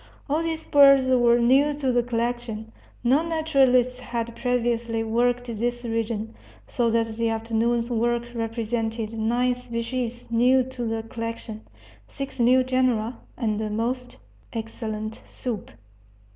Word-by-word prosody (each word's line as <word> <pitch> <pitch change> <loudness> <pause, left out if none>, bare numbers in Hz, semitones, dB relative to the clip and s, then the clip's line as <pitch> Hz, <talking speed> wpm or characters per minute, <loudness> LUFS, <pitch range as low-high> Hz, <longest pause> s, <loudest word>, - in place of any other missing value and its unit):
All 300 +3 +1
these 325 -1 -3
birds 275 -2 +7
were 240 -2 +5
new 275 +5 +4
to 275 -3 0
the 245 0 +3
collection 235 -2 -3 0.3
no 260 +5 +4
naturalists 270 -7 +2
had 235 -2 -4
previously 235 -2 0
worked 245 +2 +1
this 240 +1 -2
region 225 -1 -2 0.3
so 240 -2 +1
that 230 0 +2
the 230 -1 +1
afternoon's 230 +1 0
work 235 +1 +1
represented 225 -1 -2
nine 240 +3 +1
species 240 0 -4
new 250 +3 +4
to 250 -1 -5
the 225 0 -2
collection, 230 -1 -6 0.5
six 275 -2 -7
new 250 +2 +5
genera, 250 -3 0 0.2
and 215 -3 -1
a 215 - -2
most 245 +4 -3 0.4
excellent 220 -1 -5
soup. 235 -6 -5
235 Hz, 130 wpm, -25 LUFS, 225-250 Hz, 0.5 s, birds